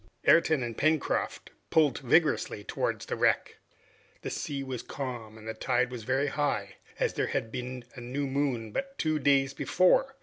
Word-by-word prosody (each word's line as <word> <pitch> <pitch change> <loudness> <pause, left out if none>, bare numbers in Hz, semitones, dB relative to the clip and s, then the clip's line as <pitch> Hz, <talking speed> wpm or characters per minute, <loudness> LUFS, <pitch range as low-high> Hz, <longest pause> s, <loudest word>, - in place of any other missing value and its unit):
Ayrton 160 -5 +5
and 120 -1 -4
Pencroft 155 +2 0 0.2
pulled 150 -5 +3
vigorously 135 -6 +2
towards - - -2
the - - -3
wreck. - - +1 0.7
The - - -3
sea 140 -2 -3
was 130 -3 -4
calm 120 -5 -6
and 110 0 -11
the 110 - -2
tide 125 +2 0
very 130 +4 0
high, 135 -9 -1 0.2
as - - +1
there - - 0
had 110 - -2
been 125 0 -5
a 125 - -9
new 130 +4 -3
moon 135 -5 -1
but 275 - -4
two 155 -1 +1
days 135 -1 +3
before. 265 +9 +3
135 Hz, 165 wpm, -29 LUFS, 120-145 Hz, 0.7 s, Ayrton